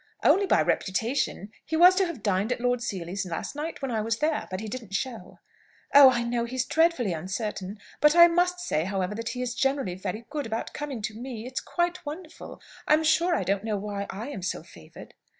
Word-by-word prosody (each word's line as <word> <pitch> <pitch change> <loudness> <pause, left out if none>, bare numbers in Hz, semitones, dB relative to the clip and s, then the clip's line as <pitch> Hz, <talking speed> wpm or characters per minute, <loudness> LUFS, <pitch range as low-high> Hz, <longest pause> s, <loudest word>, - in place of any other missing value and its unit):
"Only 395 +1 +4
by - - +4
reputation. 215 0 -1
He 320 - -2
was 355 +3 +8
to 385 -2 +3
have 310 -11 -7
dined 200 +3 +1
at 245 - -1
Lord 245 0 0
Seely's 195 -3 -3
last 180 - -5
night, 300 0 -5
when 270 - -2
I 220 -2 0
was 225 0 -1
there. 305 +4 0
But 185 - -4
he 220 - -6
didn't 220 -3 -6
show." 245 +1 -4 0.6
"Oh, 280 -1 +10
I 240 -2 0
know 235 0 -1
he's 255 +1 -2
dreadfully 320 - +2
uncertain. 190 +3 -4 0.2
But 300 +1 +5
I 340 0 +10
must 355 +1 +1
say, 165 - -1
however, 190 0 -2
that 230 +2 -4
he 250 0 -3
is 245 -1 -3
generally 270 -8 0
very 190 +5 -5
good 290 -5 -3
about 225 0 -4
coming 280 -7 -5
to 215 0 -3
me. 235 0 -7
It's 255 +1 -4
quite 350 0 -2
wonderful. 315 +2 -8 0.3
I'm 310 +1 +4
sure 340 +3 +3
I - - 0
don't 195 +2 0
know 215 -2 -1
why 200 0 -4
I 220 +8 -6
am 200 - -6
so 180 -3 -3
favoured!" 85 - -14
235 Hz, 215 wpm, -27 LUFS, 200-295 Hz, 0.6 s, Oh